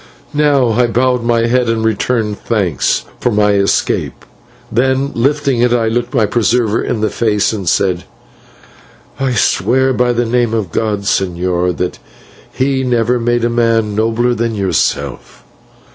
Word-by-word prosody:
Now 145 -4 +2
I 120 +2 +2
bowed 125 +1 +1
my 115 -1 +1
head 120 0 +1
and 110 -1 0
returned 110 -1 -1
thanks 95 - -1
for - - 0
my 105 -2 +2
escape; 100 0 0 0.5
then, 130 +3 +1
lifting 140 0 0
it, 125 0 +3
I 115 -2 +1
looked 120 +1 -2
my 115 -4 +3
preserver 115 0 +1
in 110 - -2
the 110 - 0
face 105 -2 0
and 95 -6 -2
said: 90 -2 0 1.1
"I 135 -2 0
swear 125 +5 +2
by 125 -1 +1
the 120 0 0
name 120 -1 0
of 100 -7 -2
God, 105 0 -1
señor, 90 -2 -1
that 90 - -3 0.5
He 130 0 0
never 120 -1 +1
made 120 0 0
a - - +1
man 115 -2 +1
nobler 115 +3 +1
than 115 -1 -2
yourself!" 95 -4 -2
115 Hz, 150 wpm, -15 LUFS, 105-125 Hz, 1.1 s, it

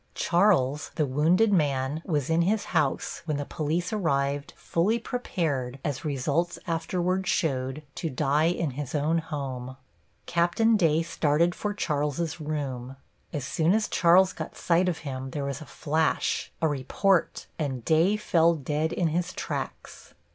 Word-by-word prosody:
Charles, 170 -7 +2
the 155 - +2
wounded 165 +11 +3
man, 145 -3 +1
was 150 -7 0
in 165 +1 +3
his 205 +5 +1
house 150 -5 0
when 155 -3 -1
the 145 - -3
police 165 +6 -2
arrived, 140 -7 0
fully 195 +8 +1
prepared, 160 - -2
as 140 -4 -2
results 150 +4 -1
afterward 180 +2 -1
showed, 135 -4 -1
to 165 - -3
die 145 +3 +1
in 170 -3 0
his 140 +2 -5
own 155 +3 +2
home. 130 -5 -5 0.5
Capt. 170 +2 0 0.2
Day 165 -4 +3
started 165 +1 +1
for 205 +2 -3
Charles's 150 -1 -1
room. 135 -4 -4 0.4
As 145 -5 -3
soon 165 +6 +2
as 220 -1 +1
Charles 185 +2 +4
got - - -7
sight 175 +2 +2
of 170 - -2
him 130 -1 -4
there 140 +1 -3
was 140 0 -4
a 155 - -10
flash, 155 +1 0
a - - +5
report, 155 +6 +1
and 135 -6 -3
Day 170 +6 +3
fell 170 -5 +3
dead 150 +2 -1
in 175 -2 0
his 175 +3 -1
tracks. - - -6
155 Hz, 150 wpm, -27 LUFS, 140-175 Hz, 0.5 s, a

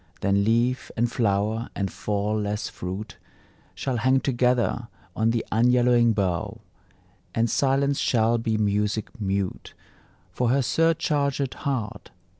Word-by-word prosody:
Then 100 0 +2
leaf, 120 +4 +1
and 120 +1 +1
flower, 110 -1 0
and 100 -2 -2
fall 105 +1 -1
less 105 +1 -3
fruit 95 +4 -6 0.6
Shall 130 -3 -2
hang 130 +4 +3
together 125 -2 +1 0.3
on 110 +1 +2
the 115 0 0
unyellowing 120 0 +4
bough; 95 -5 -2 0.7
And 115 0 +2
silence 140 +3 +1
shall 115 0 +2
be 115 -1 -1
Music 105 +3 -1
mute 95 -1 -3 0.6
For 125 -2 0
her 135 +3 +3
surchargèd 145 -3 +1
heart. 130 -8 -4
115 Hz, 120 wpm, -25 LUFS, 105-125 Hz, 0.7 s, unyellowing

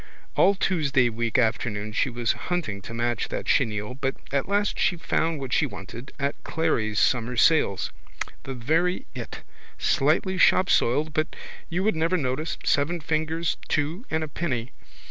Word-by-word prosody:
All 200 - +5
Tuesday 145 -10 +2
week 115 0 -1
afternoon 110 -3 0
she 130 - +1
was 120 -2 0
hunting 160 - -3
to 115 - -8
match 120 0 0
that - - -4
chenille 105 -3 +1
but 135 0 -2 0.2
at 140 -1 0
last 205 +1 +1
she 180 - +2
found 165 -1 0
what 135 -3 -4
she - - +3
wanted 115 +7 -9
at 140 +1 -2
Clery's 115 -10 0
summer 120 +1 +2
sales, 115 - +3 0.5
the 135 - -6
very 160 +9 +1
it, - - -7 0.4
slightly 170 +7 +2
shopsoiled 155 -5 +4
but 155 0 -1 0.3
you 180 +2 -1
would 215 -2 +2
never 165 +3 +2
notice, 145 +1 -2
seven 155 +5 +2
fingers 160 +1 -1
two 155 - -1
and 160 0 0
a - - -3
penny. 135 -6 -3
140 Hz, 155 wpm, -26 LUFS, 120-165 Hz, 0.5 s, All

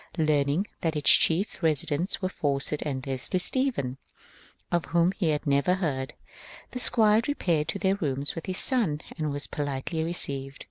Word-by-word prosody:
Learning 155 +2 +1 0.2
that 165 -2 -1
its 150 - +4
chief 185 +5 +2
residents 160 +3 0
were - - +2
Fawcett 145 -3 -2
and 130 -3 -4
Leslie 135 +6 0
Stephen, 180 - -1 0.7
of 175 -1 0
whom 170 +1 +2
he 190 -3 -2
had 150 +1 -1
never 140 +5 +2
heard, 145 -7 -3 0.6
the 250 - -4
squire 220 -3 +5
re 290 - -1
paired 160 - 0
to 165 - -2
their 195 0 0
rooms 140 -4 -1
with 165 - -8
his 185 -1 -1
son 195 - +4 0.2
and 155 -2 -1
was 145 0 -1
politely 145 +3 -3
received. 140 -5 -2
155 Hz, 170 wpm, -26 LUFS, 140-185 Hz, 0.7 s, squire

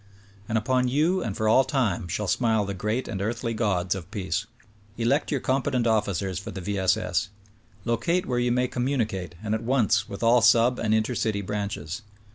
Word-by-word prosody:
And 110 - +1
upon 125 +3 +1
you 160 +8 +2
and 100 - -3
for 110 - 0
all 130 +5 +6
time 120 - 0
shall 100 +5 -2
smile 110 -1 +2
the 100 - -3
great 105 +6 -2
and 100 -4 -4
earthly 115 +2 -2
gods 95 -6 0
of 90 -2 -7
peace. 95 0 -3 0.5
Elect 120 +6 +1
your 140 - 0
competent 130 -2 0
officers 100 -5 0
for 100 - -8
the - - -6
V. 100 +2 -3
S. 95 -1 +3
S. - - -1 0.6
Locate 165 +11 0
where 125 -1 -1
you 120 0 +1
may 125 +1 +2
com 125 0 -2
municate 105 -10 -2
and 110 0 -1
at 110 - -1
once 115 -4 +1
with 100 +3 -6
all 120 +1 +5
sub 115 +3 +4
and 110 -1 +2
inter 110 +3 0
city 110 -3 -1
branches. 100 -2 -4
110 Hz, 200 wpm, -26 LUFS, 100-125 Hz, 0.6 s, all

